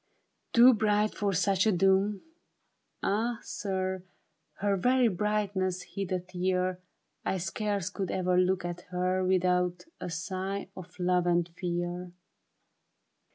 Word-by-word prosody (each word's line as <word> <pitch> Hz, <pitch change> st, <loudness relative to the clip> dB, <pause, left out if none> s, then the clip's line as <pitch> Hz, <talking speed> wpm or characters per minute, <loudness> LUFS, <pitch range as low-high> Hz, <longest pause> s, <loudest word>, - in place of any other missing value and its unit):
Too 245 Hz, +2 st, +8 dB
bright 210 Hz, -1 st, +2 dB
for 205 Hz, -1 st, 0 dB
such 195 Hz, +2 st, +2 dB
a -, -, +5 dB
doom? 195 Hz, +2 st, +2 dB, 0.8 s
Ah 225 Hz, +4 st, 0 dB
sir, 190 Hz, -2 st, -2 dB, 0.5 s
Her 200 Hz, 0 st, +1 dB
very 250 Hz, +6 st, +3 dB
brightness 195 Hz, -2 st, -1 dB
hid 195 Hz, -1 st, -3 dB
a 185 Hz, -, +1 dB
tear; 180 Hz, 0 st, -1 dB, 0.4 s
I 190 Hz, -, 0 dB
scarce 200 Hz, +1 st, -2 dB
could 195 Hz, -3 st, -3 dB
ever 185 Hz, -1 st, +1 dB
look 185 Hz, 0 st, +2 dB
at 175 Hz, 0 st, -4 dB
her 185 Hz, +1 st, 0 dB
Without 180 Hz, -1 st, +1 dB
a -, -, -5 dB
sigh 190 Hz, +3 st, -4 dB
of 180 Hz, -1 st, -11 dB
love 180 Hz, 0 st, +2 dB
and 175 Hz, -1 st, +2 dB
fear. 175 Hz, 0 st, -4 dB
185 Hz, 125 wpm, -29 LUFS, 180-200 Hz, 0.8 s, Too